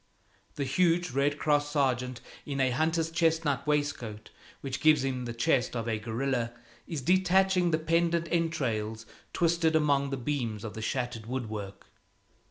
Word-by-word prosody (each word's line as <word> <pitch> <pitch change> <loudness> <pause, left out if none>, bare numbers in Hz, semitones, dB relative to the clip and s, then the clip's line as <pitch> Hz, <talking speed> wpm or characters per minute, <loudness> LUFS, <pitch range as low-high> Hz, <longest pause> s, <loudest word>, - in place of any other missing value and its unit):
The 140 - -2
huge 175 +5 +2
Red 140 +3 +1
Cross 145 -1 +1
sergeant, 130 -4 0 0.2
in 140 -2 -4
a 130 -1 +3
hunter's 160 +4 0
chestnut 160 -4 +1
waistcoat 145 -8 -2 0.3
which 135 -1 -4
gives 155 -3 +5
him 130 -2 -2
the 120 - -4
chest 125 0 +1
of 115 -1 -3
a 110 -2 -1
gorilla, 120 +2 -2 0.3
is 160 -5 -4
detaching 185 +1 +3
the 160 - +2
pendent 170 +1 +1
entrails 115 -10 -1 0.3
twisted 165 -1 +2
among 140 -3 +2
the 135 - -2
beams 120 -5 -3
of 110 - -5
the 110 - -6
shattered 120 -1 -3
woodwork. 110 -6 -5
140 Hz, 150 wpm, -29 LUFS, 120-160 Hz, 0.3 s, gives